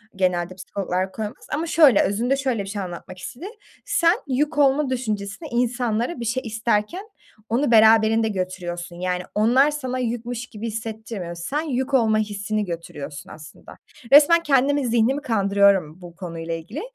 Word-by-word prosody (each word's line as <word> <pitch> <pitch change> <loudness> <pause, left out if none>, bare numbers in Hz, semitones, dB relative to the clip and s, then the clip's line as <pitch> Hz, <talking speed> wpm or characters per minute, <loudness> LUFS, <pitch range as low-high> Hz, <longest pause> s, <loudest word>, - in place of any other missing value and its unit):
genelde 180 -1 0
psikologlar 185 0 -3
koymaz. 215 0 -7
Ama 320 +3 -1
şöyle, 295 -10 +6
özünde 235 +7 +1
şöyle 255 -7 -1
bir 195 - -8
şey 205 0 -4
anlatmak 180 0 -8
istedi. 260 - -8 0.4
Sen 335 +1 +3
yük 290 +3 -1
olma 280 0 +3
düşüncesini, 215 +1 -3
insanlara 240 +3 -1
bir 235 - -4
şey 245 +3 -1
isterken 225 - -1 0.4
onu 245 +2 +1
beraberinde 220 0 +5
götürüyorsun. 175 -2 -5
Yani, 180 0 -2
onlar 250 +8 +4
sana 260 -4 -4
yükmüş 240 0 -3
gibi 225 0 -7
hissettirmiyor. 220 -5 -6
Sen 270 - -3
yük 270 -3 -3
olma 220 -4 +3
hissini 210 0 -2
götürüyorsun 155 -4 -7
aslında. 155 -1 -13 0.4
Resmen 335 +4 +7
kendimi 280 -1 +2
zihnimi 240 +5 +2
kandırıyorum 200 - +2
bu 170 -1 -11
konuyla 165 -3 -6
ilgili 165 - -6
220 Hz, 145 wpm, -23 LUFS, 190-260 Hz, 0.4 s, Resmen